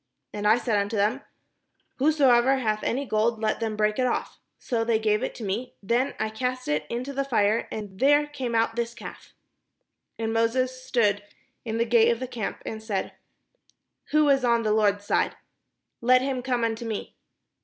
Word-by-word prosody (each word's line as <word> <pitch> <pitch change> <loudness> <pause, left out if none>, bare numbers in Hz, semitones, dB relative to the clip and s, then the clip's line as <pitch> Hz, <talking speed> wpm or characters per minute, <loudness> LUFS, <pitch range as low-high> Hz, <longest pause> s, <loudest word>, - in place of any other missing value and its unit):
And 210 0 -1
I 220 +2 +6
said 235 -3 0
unto 200 +3 -2
them, 215 +7 +1 0.8
'Whosoever 270 -3 +4
hath 215 -4 -1
any 275 +4 -1
gold, 220 -1 +1
let 215 -1 0
them 220 -2 -2
break 210 +1 +1
it 255 - +2
off.' - - -3 0.2
So 230 -2 -1
they 225 -1 +2
gave 215 -1 +1
it - - -4
me; 220 +3 -4
then 240 +7 0
I 220 - 0
cast 250 +3 -3
it 150 0 -1
into 255 +4 -4
the 275 0 0
fire 225 -4 +1
and 205 -3 -7
there 290 +2 +4
came 265 -5 -4
out 225 0 +1
this 235 0 -2
calf." 230 - -11 0.8
Then 225 0 -2
Moses 255 +3 0
stood 220 -6 +1 0.4
in 225 -1 -2
the 230 - +2
gate 235 0 +4
of 235 -1 +1
the 255 - -4
camp, 235 -5 -5
and 220 0 -5
said: 210 -3 -3 0.9
"Who 305 0 +3
is 270 -2 +3
on 235 -1 +2
the 215 -1 +1
Lord's 205 -1 +2
side? - - +1 0.7
let 255 +2 +4
him 265 -2 -2
come 245 -2 -1
unto 225 0 -1
me." 225 -2 -5
230 Hz, 185 wpm, -26 LUFS, 215-255 Hz, 0.9 s, I